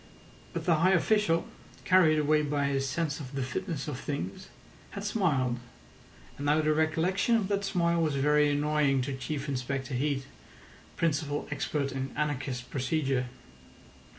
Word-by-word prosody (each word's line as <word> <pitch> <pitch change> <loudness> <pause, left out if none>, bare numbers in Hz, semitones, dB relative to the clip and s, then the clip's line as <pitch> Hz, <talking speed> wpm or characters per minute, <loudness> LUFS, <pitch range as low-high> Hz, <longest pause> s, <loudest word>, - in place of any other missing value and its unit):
But - - -4
the 170 -4 +4
high 185 +4 +4
official, 185 -2 +2 0.4
carried 175 -4 +5
away 150 0 +3
by 145 -1 0
his 135 -1 0
sense 155 -1 -1
of 135 -2 -8
the 135 - -1
fitness 160 +2 -4
of 140 -4 -4
things, 165 +7 -5 0.4
had 200 - -7
smiled, 145 - +1 0.8
and 145 - -3
now 150 +2 +4
the 155 0 +2
recollection 165 +8 +2
of 210 -4 0
that 200 0 0
smile 170 -3 +1
was 155 -3 +1
very 150 +2 +3
annoying 145 -2 +2
to 140 +1 -3
Chief 140 +2 -4
Inspector 135 0 -3
Heat, 135 +1 0 0.7
principal 150 -3 0
expert 145 -1 -1
in 135 0 -3
anarchist 135 -4 -2
procedure. 135 -1 0
150 Hz, 150 wpm, -29 LUFS, 135-165 Hz, 0.8 s, carried